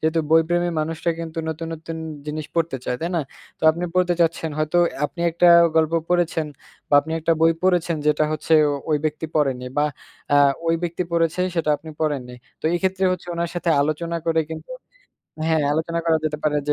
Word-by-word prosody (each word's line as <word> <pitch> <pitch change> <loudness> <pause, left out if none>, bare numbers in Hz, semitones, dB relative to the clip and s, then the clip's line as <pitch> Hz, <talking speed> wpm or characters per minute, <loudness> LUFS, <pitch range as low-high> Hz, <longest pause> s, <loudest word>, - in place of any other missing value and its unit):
যেহেতু 160 +1 +1
বইপ্রেমী 175 +2 +3
মানুষরা 160 +2 -2
কিন্তু 165 -1 -6
নতুন, 160 +1 -4
নতুন, 160 +1 -7 0.3
জিনিস 150 0 -4
পড়তে 165 -4 0
চায়, 125 - -1
তাই 170 - -1
না? - - +2 0.4
তো - - -36
আপনি 170 +3 -4
পড়তে 180 -1 +2
চাচ্ছেন 165 -1 +1
হয়তো 155 +2 0 0.3
আপনি 170 - -5
একটা 170 +2 +2 0.3
গল্প 160 0 +3 0.2
পড়েছেন, 175 -3 +1 0.4
বা - - +2
আপনি 160 +3 -7
একটা 165 +1 +2
বই 165 0 +5
পড়েছেন। 175 -3 +2
যেটা 150 0 +3
হচ্ছে 155 +1 -2 0.4
ওই 150 - +4
ব্যক্তি 155 +1 -2
পড়েনি 135 -4 +1
বা 145 - +3 0.5
আ - - +6 0.3
ওই 165 - +3
ব্যক্তি 175 +1 -2
পড়েছে 165 +1 +1
সেটা 165 -3 0
আপনি 160 +2 -11
পড়েননি। 140 -6 -2 0.3
তো - - -27
এক্ষেত্রে 190 +1 0
হচ্ছে 180 -1 -6
উনার 170 0 -2
সাথে 175 -1 -1
আলোচনা 155 +3 -1
করে 160 0 +3
কিন্তু 160 - -9 0.8
হ্যাঁ, 160 -2 +2
আলোচনা 160 +2 -1
করা 165 -1 +3
যেতে 150 -1 -1
পারে 150 -1 +2
যে, - - +4
160 Hz, 185 wpm, -22 LUFS, 155-170 Hz, 0.8 s, আ